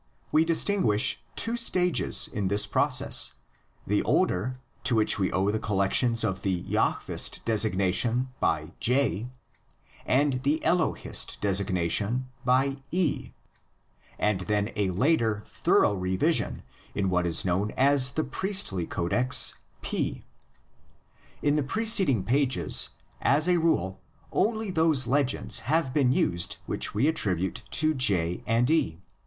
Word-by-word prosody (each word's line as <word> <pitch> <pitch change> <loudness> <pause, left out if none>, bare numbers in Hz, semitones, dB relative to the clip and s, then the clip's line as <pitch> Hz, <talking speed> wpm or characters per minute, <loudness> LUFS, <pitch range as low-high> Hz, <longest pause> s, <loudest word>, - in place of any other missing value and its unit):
We 155 - +4
distinguish 165 - +1
two 230 +1 0
stages 180 -7 +2
in 100 -3 -3
this 100 +2 +3
process: 105 - +2 0.5
the - - +1
older, 125 +8 0 0.3
to 120 - +2
which 110 -1 +2
we 95 - 0
owe 95 +2 +1
the 110 - -2
collections 110 +3 +1
of 95 0 -2
the 95 -3 -2
Jahvist - - -2
designated 110 +2 +1
by 80 -1 -1
'J' 125 -4 0 0.8
^iid 130 -1 +2
the 145 +4 0
Elohist 175 -1 0
designated 100 +4 0 0.2
by 135 +2 +1
'E', 175 -4 -1 0.9
and 105 -3 0
then 105 +2 -1
a 100 -3 0
later, 110 - +1
thorough - - +2
revision 95 -1 0 0.3
in 95 -2 -1
what 90 -1 +1
is 85 +2 0
known 95 +3 0
as 135 0 +4
the 155 - -1
Priestly 140 - -1
Codex 120 +8 +1 0.3
'P'. - - -3 1.2
In 145 +1 +2
the - - +2
preced 215 - +2
ing 115 -8 +1
pages 130 +3 +1 0.3
as 150 +4 +2
a 180 -1 +3
rule 95 - 0 0.3
only 220 -2 0
those 160 -6 +2
legends 135 +2 0
have 155 -4 +1
been 135 -4 +2
used 85 -9 -1
which - - -2
we 120 +8 +2
attribute 95 - -1
to 155 +1 0
J 90 - +1
and 115 +4 +2
E. 85 - 0
120 Hz, 130 wpm, -26 LUFS, 95-145 Hz, 1.2 s, We